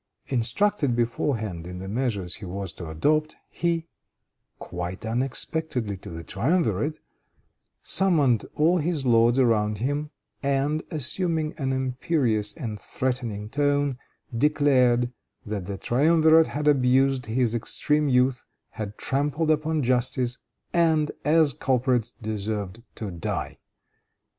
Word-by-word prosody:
Instructed 135 - +1
beforehand 110 - -1
in 90 0 -7
the 95 +1 -7
measures 100 -5 -2
he 110 - -9
was 95 0 -5
to 85 -3 -8
adopt, 155 - +1 0.2
he, 170 -1 -1 0.7
quite 90 +4 -6
unexpectedly 125 -1 -2
to - - -10
the 85 0 -7
triumvirate, 145 - 0 0.9
summoned 150 - +4
all 170 +4 +3
his 155 -3 -1
lords 120 0 +4
around 110 -5 +2
him, 145 +6 -2 0.3
and, 140 +2 0
assuming 160 +2 -1
an 135 -2 -1
imperious 130 -4 0
and 110 -3 -5
threatening 120 -5 -3
tone, 145 0 0 0.4
declared 125 -3 +3 0.3
that 100 -4 -4
the 100 -1 -4
triumvirate 160 - +4
had 150 +1 -3
abused 130 -2 +3
his 120 0 +1
extreme 150 +5 0
youth, 125 0 +2 0.2
had 105 -1 -6
trampled 150 +3 0
upon 155 0 0
justice, 125 0 0 0.3
and, 160 -3 +3
as 155 -2 +4
culprits, 125 -3 +1
deserved 105 -1 -3
to 105 -3 -5
die. 85 -2 -4
130 Hz, 115 wpm, -25 LUFS, 110-150 Hz, 0.9 s, summoned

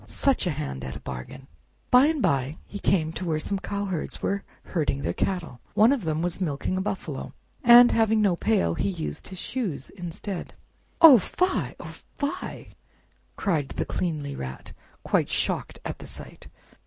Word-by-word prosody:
Such 270 -8 +1
a - - +2
hand 145 - -4
at 65 0 -5
a - - -6
bargain!" 65 - -8 0.5
By 250 +3 +7
and 310 -4 0
by 140 +3 +1
he 205 - -7
came 160 -5 +1
to 180 - -5
where 165 -3 0
some 195 +6 -2
cowherds 200 -4 -3
were 200 0 -1 0.2
herding 145 -5 -1
their - - -1
cattle. 175 -10 -2 0.2
One 220 +4 +6
of 245 -10 -3
them 160 +1 0
was 175 +1 -2
milking 155 +1 -1
a 185 - 0
buffalo, 190 -8 -4 0.3
and 240 0 +9
having 220 -1 +3
no 200 -4 +3
pail, 185 - +1
he 200 - -1
used 170 -5 -5
his 190 - -9
shoes 175 - -3
instead. 180 +1 -6 0.5
"Oh 290 -8 +11
fie! 365 - -1
oh - - -8 0.2
fie!" 285 0 -4 0.7
cried 160 -9 0
the - - -3
cleanly 150 -5 -2
Rat, 65 0 -7 0.3
quite - - +1
shocked - - -1
at - - -5
the - - -9
sight. - - -8
180 Hz, 170 wpm, -26 LUFS, 150-210 Hz, 0.7 s, Oh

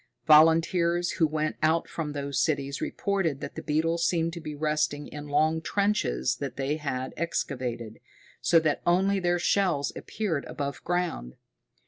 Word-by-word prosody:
Volunteers 170 +3 +4
who 160 - +5
went 155 0 -2
out 160 +2 +2
from 150 -3 -4
those 140 -1 -2
cities 140 -3 -1
reported 190 -8 -1
that - - -6
the - - -6
beetles 165 +3 0
seemed 165 -1 +1
to 170 - -7
be 150 -1 -6
resting 150 -1 -1
in 150 0 -8
long 155 +2 +2
trenches 200 - 0
that 140 -1 -5
they 140 +2 -1
had 130 -4 -4
excavated, 120 -8 -3 0.4
so 170 - +4
that 155 -2 0
only 190 +3 +2
their 175 -1 +1
shells 175 -5 +1
appeared 185 -10 -3
above 140 -1 -5
ground. 175 - -2
155 Hz, 150 wpm, -27 LUFS, 145-170 Hz, 0.4 s, who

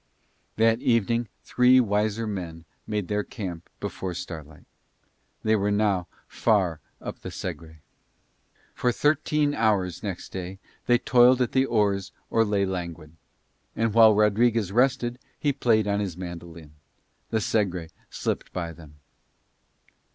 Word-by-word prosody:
That 115 +1 +3
evening 115 0 +1 0.2
three 125 +1 +5
wiser 110 0 +1
men 85 -6 -5 0.2
made 105 -4 -2
their 105 0 0
camp 90 -8 -7
before 90 -2 -4
starlight. 80 -3 -8 0.8
They 110 0 +3
were 100 -1 +1
now 100 -3 +1 0.2
far 95 -8 +1 0.2
up - - -7
the - - -7
Segre. 80 -2 -7 0.9
For 125 - +1
thirteen 150 +2 +1
hours 100 - +1
next 100 -4 -5
day 95 0 -6 0.3
they 120 - +5
toiled 125 +1 +5
at 125 - +1
the 130 0 +2
oars 100 -4 +1 0.2
or 115 - +4
lay 100 -2 +1
languid. 85 -5 -5 0.6
And 115 -1 0
while 110 -2 +7
Rodriguez 105 0 +3
rested 125 +1 +1 0.2
he 145 -2 +1
played 110 -5 +2
on 100 0 +1
his 95 -5 -3
mandolin. 85 -3 -8 0.6
The 110 - 0
Segre 95 -6 -1 0.2
slipped - - -3
by 85 -2 -4
them. 75 -2 -14
105 Hz, 130 wpm, -26 LUFS, 90-115 Hz, 0.9 s, while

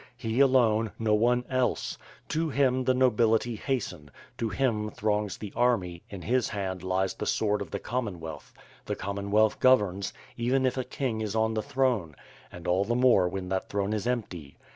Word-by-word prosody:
— 120 - -34
He 115 0 -2
alone 115 -5 +4
— - - -34
no 105 - +4
one 120 +3 +2
else! 130 -1 0 0.3
To 160 +1 0
him 130 -2 +2
the 130 - +4
nobility 120 -2 +3
hasten, 100 - -3 0.3
to 115 - 0
him 105 0 0
throngs 105 -1 -1
the 105 -3 -8
army, 95 -9 +1
in 95 -4 -8
his 125 +4 +1
hand 95 -4 -3
lies 95 0 0
the - - -5
sword 105 -1 +1
of 100 - -5
the - - -3
Commonwealth, 90 - -5 0.4
the - - -1
Common 100 0 -4
wealth 110 +1 +3
governs, 105 -7 +3 0.2
even 130 +3 +1
if 130 - +1
a 130 - -1
king 125 -3 -3
is 105 -1 -3
on 110 0 +2
the 110 - 0
throne, 115 - 0 0.4
and 90 - -9
all 90 +2 +3
the 120 +4 -1
more 120 -8 +4
when 95 0 -5
that 95 0 -2
throne 100 +1 -1
is 110 +2 -2
empty. 90 - -4
110 Hz, 190 wpm, -28 LUFS, 95-125 Hz, 0.4 s, alone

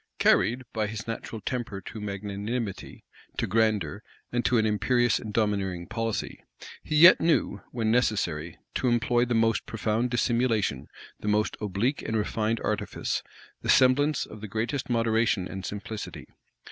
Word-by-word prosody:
Carried 120 +7 +3
by 110 -2 0
his 110 +1 -6
natural 115 -1 -5
temper 120 -5 -3
to 105 +3 -8
magnanimity, 105 +2 -4 0.3
to - - 0
grandeur, 105 -5 +1 0.3
and 120 0 0
to 125 - +3
an 110 - +3
imperious 120 +3 +2
and 110 - -7
domineering 100 -5 0
policy, 115 +2 -3 0.4
he 155 - -3
yet 170 +4 +8
knew, 160 -10 +1
when 115 -3 0
necessary, 90 -9 0 0.2
to 130 - 0
employ 120 0 +2
the 120 -1 -1
most 115 0 +2
profound 115 +2 0
dissimulation, 115 - +1 0.3
the - - -6
most 105 0 +1
oblique 105 +7 -1
and 110 - -2
refined 110 +1 0
artifice, - - -2 0.4
the - - -5
semblance 140 +3 +4
of 110 - -11
the 110 - -5
greatest 115 +7 -2
moderation 115 -4 +1
and 95 0 -6
simplicity. 105 +1 -6
110 Hz, 145 wpm, -27 LUFS, 105-120 Hz, 0.4 s, yet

